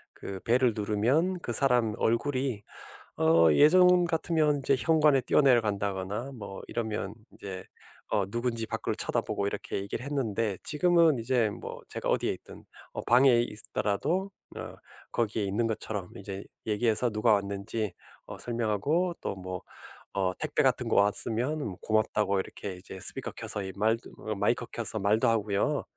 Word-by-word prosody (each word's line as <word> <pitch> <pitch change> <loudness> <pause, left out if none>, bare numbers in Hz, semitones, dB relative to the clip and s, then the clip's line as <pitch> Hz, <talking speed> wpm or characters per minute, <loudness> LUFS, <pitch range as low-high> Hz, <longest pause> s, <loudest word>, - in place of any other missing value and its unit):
그 95 -1 -7
벨을 125 +1 +3
누르면 120 - +1
그 120 - -4
사람 120 -3 +3
얼굴이 130 -2 0 0.5
어 80 +1 +5
예전 180 - +6
같으면 160 -3 +1
이제 135 0 +2
현관에 150 -3 +4
뛰어 125 - +2
내려 130 -5 +5
간다거나 100 +4 -3
뭐 100 -4 -8
이러면 110 -3 -3 0.2
이제 95 -2 -7 0.5
어 100 - +1
누군지 120 0 -2
밖을 - - -3
쳐다보고 100 - -1
이렇게 100 - -4
얘기를 100 +5 -4
했는데 115 -8 -1
지금은 165 -2 +3
이제 115 -2 +1
뭐 - - -8
제가 - - -4
어디에 - - +1
있든 - - -12 0.3
어 - - -5
방에 120 -1 +5
있더라도 110 - -1 0.3
어 - - -7 0.4
거기에 110 -2 0
있는 110 +4 0
것처럼 105 -4 -3
이제 100 0 -6 0.2
얘기해서 110 +2 +2
누가 110 +1 +2
왔는지 100 0 -2 0.3
어 - - -8
설명하고 120 - 0
또 - - -3
뭐 95 -1 -6 0.6
어 95 -1 +2
택배 - - 0
같은 - - +1
거 - - 0
왔으면 115 +8 +1
뭐 105 -10 -4
고맙다고 105 -2 +1
이렇게 95 -1 -5
이제 95 0 -10
스피커 - - +1
켜서 105 - -2
이 95 -1 -6
말도 110 +3 0 0.3
마이크 - - +1
켜서 - - 0
말도 110 +4 +2
하고요. 110 +5 +1
110 Hz, 325 characters per minute, -29 LUFS, 100-135 Hz, 0.6 s, 예전